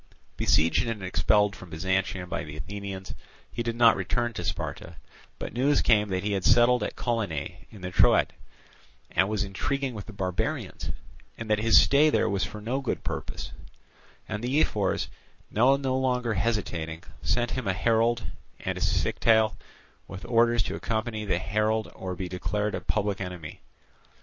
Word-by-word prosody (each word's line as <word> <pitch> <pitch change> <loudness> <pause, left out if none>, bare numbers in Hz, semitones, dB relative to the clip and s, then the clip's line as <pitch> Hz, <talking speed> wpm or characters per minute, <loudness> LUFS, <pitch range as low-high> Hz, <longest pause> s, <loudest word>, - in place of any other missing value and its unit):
Besieged 85 +9 +3
and 110 -4 -3
expelled 100 +3 +2
from 90 - -12
Byzantium 95 +2 -1
by - - -3
the 75 0 -8
Athenians, 95 +2 -6 0.4
he 120 - -3
did 115 0 -2
not 115 -1 +6
return 120 +5 -1
to 90 - -5
Sparta; 85 0 -4 0.4
but - - -6
news 135 +5 +2
came 105 -2 +4
that 95 0 -1
he 105 - -1
had 95 -2 -1
settled 120 +4 +5
at - - -3
Colonae 90 - -3
in 105 -4 -13
the 90 0 -5
Troad, - - +4 0.8
and 95 - +2
was 105 -1 0
intriguing 130 +7 -2
with 105 -3 -7
the - - -8
barbarians, 95 -2 -3 0.5
and 115 -1 -5
that 105 - +3
his 115 0 +7
stay 145 +2 +5
there - - +2
was 100 -1 0
for 105 - -5
no 120 +6 -2
good 135 - -3
purpose; - - -5 0.8
and 110 +1 -4
the 130 +5 +1
ephors, 100 -10 +1 0.4
now 125 +5 +5
no 135 -2 -1
longer 125 -3 +1
hesitating, 90 -8 -2 0.2
sent 120 -1 0
him 130 -4 -3
a 95 - +2
herald 115 +4 +2 0.4
and - - -3
a - - -8
scytale 110 -1 +2 0.5
with 95 0 -8
orders 115 -2 +3
to - - -4
accompany 110 -1 -2
the - - +1
herald 110 +2 0
or 95 -1 -5
be 90 0 -4
declared 105 +4 -2
a - - -3
public 100 -2 -1
enemy. 90 -5 -7
105 Hz, 170 wpm, -27 LUFS, 95-120 Hz, 0.8 s, his